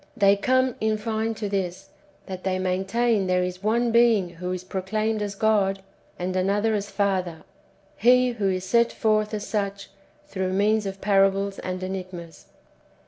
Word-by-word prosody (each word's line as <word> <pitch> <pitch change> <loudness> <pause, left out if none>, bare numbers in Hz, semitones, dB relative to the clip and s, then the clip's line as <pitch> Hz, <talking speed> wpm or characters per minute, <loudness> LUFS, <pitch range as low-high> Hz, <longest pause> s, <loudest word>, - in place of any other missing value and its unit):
They 200 -2 +5
come, 255 +4 +2
[in 220 0 +1
fine,] 220 +1 -2
to 215 -1 -4
this, 190 -3 -3 0.4
that 185 -2 -7
they 190 -1 0
maintain 195 +3 0
there 180 0 +2
is 180 0 -4
one 230 +3 +1
Being 230 -5 +4
who 180 +1 -6
is 185 0 -4
proclaimed 215 +4 -2
as 205 -1 -3
God, 195 -2 +1 0.3
and 185 +1 -3
another 200 +4 +1
as 205 -1 -2
Father, 185 -6 -1 0.5
He 250 +2 +4
who 210 -5 -1
is 185 -1 -2
set 235 +4 +3
forth 215 -1 +1
as 210 -2 -4
such 200 -2 -3 0.3
through 190 -9 -3
means 210 +1 +2
of 195 0 -6
parables 195 0 +2
and 185 0 -4
enigmas. 185 -3 -7
200 Hz, 160 wpm, -24 LUFS, 185-220 Hz, 0.5 s, They